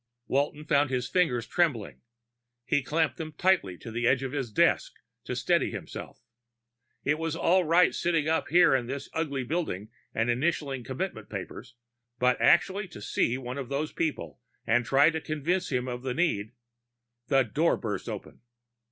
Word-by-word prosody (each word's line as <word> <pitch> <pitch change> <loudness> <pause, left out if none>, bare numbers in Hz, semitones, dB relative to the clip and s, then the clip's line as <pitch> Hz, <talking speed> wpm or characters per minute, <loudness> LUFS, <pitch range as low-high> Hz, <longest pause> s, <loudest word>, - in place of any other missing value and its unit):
Walton 145 +2 0
found 145 -2 +3
his 125 -1 -1
fingers 125 -10 +1
trembling; 130 - 0 0.6
he 145 - +2
clamped 155 +3 0
them 155 -2 -6
tight 190 0 +4 0.2
to 115 - -8
the 120 +1 0
edge 130 +1 +3
of 130 - -3
his 135 -5 -3
desk - - +2 0.3
to - - -3
steady - - +2
himself. - - -8 0.8
It 150 +2 +1
was 165 -1 -2
all 175 +2 +3
right 170 +3 +4
sitting 165 -3 0
up 160 +1 +1
here 175 -4 +5
in 125 -3 +1
this 135 +2 -5
ugly 140 -5 -1
building 120 - -3 0.2
and 115 +1 0
initialing 135 -1 -1
commitment 155 +10 -5
papers, 120 - -7 0.4
but 125 +1 +2
actually 190 +3 +3
to 165 - -11
see 115 +3 0
one 130 +1 -5
of 130 -3 -6
those 145 +2 -2
people 145 - -3 0.3
and 120 +2 +2
try 140 +4 +5
to 160 -1 -3
convince 165 +5 -1
him 125 -1 0
of 125 -1 -4
the 130 -1 -3
need 120 -11 0 0.7
The 135 -1 +4
door 150 +9 +1
burst 105 -5 -4
open. - - -8
140 Hz, 170 wpm, -28 LUFS, 125-165 Hz, 0.8 s, here